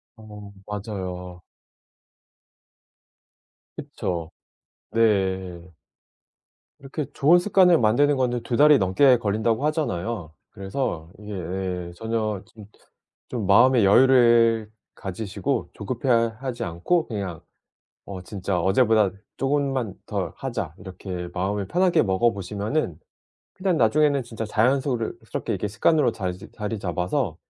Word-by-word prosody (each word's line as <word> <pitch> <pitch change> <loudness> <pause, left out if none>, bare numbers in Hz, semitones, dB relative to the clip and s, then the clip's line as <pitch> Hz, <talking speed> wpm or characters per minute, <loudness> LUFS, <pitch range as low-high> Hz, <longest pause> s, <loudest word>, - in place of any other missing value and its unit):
어. 105 -2 -12
맞아요. 90 -4 -6 2.4
그쵸. 85 -2 -4 0.6
네. 95 -5 +1 1.2
이렇게 140 +2 -5
좋은 165 +6 +5
습관을 180 -2 +4
만드는 135 +6 +3
거는 125 -2 0
2 120 0 -2
달이 150 0 +7
넘게 120 +8 +4
걸린다고 110 +5 0
하잖아요. 110 - -2 0.2
그래서 95 - -4
이게 105 0 -8
예 90 -1 -4
전혀 110 -2 -2
좀 110 -2 -14 0.6
좀 115 -6 -3
마음의 120 +2 +5
여유를 115 -1 +5 0.2
가지시고 100 0 -3
조급해 120 +5 -4 0.3
하지 130 -5 -4
않고 90 - 0
그냥 100 -7 -5 0.7
'어 95 -2 -7
진짜 95 -1 -3
어제보다 105 +1 +3 0.2
쪼금만 135 -6 -1
더 95 -5 -3
하자.' 115 - -4
이렇게 90 -1 -7
마음을 95 +2 -2
편하게 180 0 +3
먹어 105 +4 +2
보시면은 100 - -3 0.6
그냥 185 -3 0
나중에는 140 +4 +3
진짜 115 -2 -6
자연소르 125 +2 +1
...스럽게 - - -3
이게 105 - -3
습관으로 145 +7 +2
자리 100 +3 -5
잡아서 90 - -2
110 Hz, 250 characters per minute, -24 LUFS, 95-130 Hz, 2.4 s, 달이